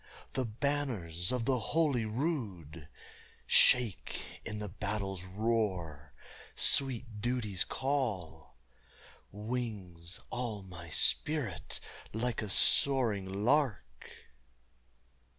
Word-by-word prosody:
the 130 Hz, -, 0 dB
banners 110 Hz, -, -1 dB
of 125 Hz, -2 st, -1 dB
the 130 Hz, -1 st, +2 dB
holy 140 Hz, -1 st, +1 dB
rood 105 Hz, -, -3 dB, 0.6 s
Shake 120 Hz, -6 st, +3 dB
in 105 Hz, -, -5 dB
the 105 Hz, 0 st, -4 dB
battle's 100 Hz, -1 st, -3 dB
roar; 95 Hz, -8 st, -2 dB, 0.4 s
sweet 120 Hz, -5 st, +2 dB
duty's 115 Hz, -5 st, 0 dB
call 95 Hz, -, -2 dB, 0.8 s
Wings 105 Hz, -6 st, -4 dB
all 115 Hz, -5 st, -3 dB
my 85 Hz, -3 st, -10 dB
spirit 105 Hz, -, +1 dB, 0.3 s
like 120 Hz, +2 st, -1 dB
a 105 Hz, -, -4 dB
soaring 105 Hz, -5 st, +3 dB
lark. 135 Hz, -3 st, +3 dB
105 Hz, 85 wpm, -32 LUFS, 90-125 Hz, 0.8 s, Shake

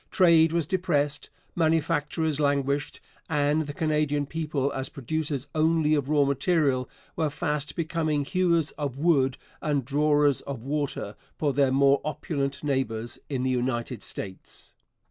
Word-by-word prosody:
Trade 165 Hz, -4 st, +5 dB
was 170 Hz, -2 st, 0 dB
depressed, 150 Hz, -5 st, 0 dB, 0.3 s
manufactures 160 Hz, -1 st, +1 dB
languished, 140 Hz, 0 st, 0 dB, 0.3 s
and 150 Hz, 0 st, +1 dB
the -, -, -3 dB
Canadian 150 Hz, -2 st, 0 dB
people 150 Hz, -3 st, -2 dB
as 130 Hz, 0 st, -4 dB
producers 145 Hz, 0 st, -3 dB
only 160 Hz, -1 st, +2 dB
of 145 Hz, -2 st, 0 dB
raw 150 Hz, -2 st, +4 dB
material 140 Hz, -2 st, +1 dB, 0.3 s
were 155 Hz, -2 st, 0 dB
fast 150 Hz, -1 st, -2 dB
becoming 155 Hz, -3 st, -1 dB
hewers 170 Hz, -1 st, +1 dB
of 140 Hz, -3 st, -3 dB
wood 140 Hz, -4 st, +2 dB, 0.2 s
and 145 Hz, -4 st, 0 dB
drawers 145 Hz, 0 st, +2 dB
of 135 Hz, -5 st, -6 dB
water 140 Hz, -7 st, -2 dB, 0.2 s
for 145 Hz, -3 st, 0 dB
their 135 Hz, -1 st, +3 dB
more 140 Hz, +1 st, +4 dB
opulent 145 Hz, -3 st, -3 dB
neighbours 120 Hz, -5 st, -2 dB
in 130 Hz, -3 st, -2 dB
the 130 Hz, -, +1 dB
United 120 Hz, -1 st, -2 dB
States. 95 Hz, -2 st, -8 dB
145 Hz, 135 wpm, -26 LUFS, 140-155 Hz, 0.3 s, Trade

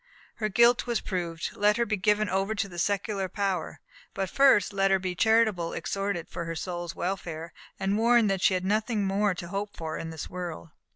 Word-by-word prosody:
Her 215 Hz, -2 st, -1 dB
guilt 235 Hz, +4 st, +4 dB
was 235 Hz, -1 st, +1 dB
proved; 170 Hz, -3 st, -3 dB
let 210 Hz, +1 st, +2 dB
her 235 Hz, -, +2 dB
be 215 Hz, -, 0 dB
given 210 Hz, +2 st, +2 dB
over 195 Hz, +3 st, 0 dB
to 205 Hz, -1 st, -1 dB
the 175 Hz, -2 st, -8 dB
secular 200 Hz, 0 st, -1 dB
power; 195 Hz, -5 st, -2 dB, 0.4 s
but 195 Hz, -1 st, -2 dB
first 265 Hz, -8 st, +4 dB
let 195 Hz, 0 st, +2 dB
her 195 Hz, -, +4 dB
be 185 Hz, -1 st, -3 dB
charitably 220 Hz, -4 st, +2 dB
exhorted 195 Hz, -4 st, -2 dB
for 170 Hz, -2 st, -5 dB
her 165 Hz, 0 st, -4 dB
soul's 175 Hz, 0 st, -4 dB
welfare, 170 Hz, -3 st, -4 dB, 0.3 s
and 195 Hz, +2 st, 0 dB
warned 235 Hz, -1 st, +4 dB
that 190 Hz, -2 st, -1 dB
she 190 Hz, -, +4 dB
had 185 Hz, 0 st, -2 dB
nothing 215 Hz, +1 st, 0 dB
more 195 Hz, 0 st, +1 dB
to 170 Hz, -1 st, -7 dB
hope 200 Hz, +2 st, -4 dB
for 160 Hz, -1 st, -4 dB
in 165 Hz, -, -5 dB
this 160 Hz, -2 st, -6 dB
world. 175 Hz, -2 st, -6 dB
195 Hz, 205 wpm, -28 LUFS, 175-210 Hz, 0.4 s, guilt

